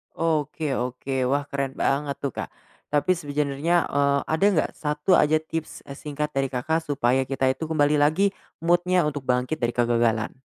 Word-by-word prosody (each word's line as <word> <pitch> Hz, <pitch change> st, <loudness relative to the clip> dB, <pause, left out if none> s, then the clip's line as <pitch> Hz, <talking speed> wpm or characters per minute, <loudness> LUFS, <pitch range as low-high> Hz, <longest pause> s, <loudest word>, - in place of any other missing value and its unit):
Oke 155 Hz, -2 st, -1 dB
oke, 125 Hz, +1 st, -2 dB
wah 140 Hz, +2 st, +1 dB
keren 135 Hz, -1 st, -2 dB
banget 140 Hz, +1 st, 0 dB
tuh 140 Hz, -, -1 dB
Kak. -, -, -5 dB, 0.4 s
Tapi 150 Hz, +5 st, +1 dB
sebenernya, 150 Hz, +1 st, 0 dB
eee, 140 Hz, 0 st, +2 dB
ada 160 Hz, +5 st, +2 dB
nggak 185 Hz, -7 st, +1 dB
satu 150 Hz, +4 st, -2 dB
aja 155 Hz, +1 st, +4 dB
tips, 160 Hz, 0 st, -6 dB
e -, -, -12 dB
singkat 150 Hz, +1 st, -4 dB
dari 135 Hz, 0 st, 0 dB
Kakak, 135 Hz, +5 st, -1 dB
supaya 130 Hz, -2 st, +1 dB
kita 135 Hz, -1 st, +1 dB
itu 160 Hz, +4 st, -5 dB
kembali 150 Hz, -2 st, +2 dB
lagi 170 Hz, +7 st, +3 dB, 0.3 s
mood-nya 175 Hz, +1 st, +3 dB
untuk 145 Hz, -3 st, -3 dB
bangkit 125 Hz, +5 st, 0 dB
dari 120 Hz, -1 st, -1 dB
kegagalan? 115 Hz, -1 st, +1 dB
145 Hz, 165 wpm, -24 LUFS, 135-155 Hz, 0.4 s, aja